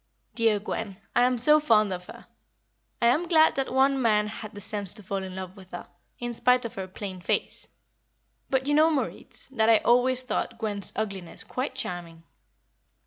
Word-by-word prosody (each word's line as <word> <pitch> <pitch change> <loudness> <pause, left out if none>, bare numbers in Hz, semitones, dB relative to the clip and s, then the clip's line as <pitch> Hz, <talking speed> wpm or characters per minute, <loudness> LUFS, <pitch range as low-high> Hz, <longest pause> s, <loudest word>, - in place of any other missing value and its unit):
"Dear 225 -3 +2
Gwen, 200 -1 -5 0.2
I 245 - +5
am 250 0 +1
so 300 +6 +7
fond 215 -9 +3
of 180 0 -7
her. - - -12 0.7
I - - +1
am 300 +9 +3
glad 320 -2 +5
that 270 -1 -2
one 270 0 +3
man 210 -3 +3
had 215 0 -8
the - - -7
sense 205 -1 -3
to 210 - -4
fall 195 +1 -3
in 190 -1 -7
love 185 0 -7
with 190 -2 -15
her, 175 - -6 0.3
in 240 0 -4
spite 250 +1 +2
of 230 - -5
her 190 -1 -6
plain 190 -1 -7
face; - - -2 0.8
but 265 0 0
you 290 - 0
know, 310 +2 +5
Moritz, 295 -4 -3
that 225 -4 +1
I 225 - +7
always 250 +2 +3
thought 245 -1 -3
Gwen's 205 -4 +3
ugliness 195 -5 -4
quite 255 +3 -4
charming." 170 -2 -5
220 Hz, 190 wpm, -26 LUFS, 195-255 Hz, 0.8 s, so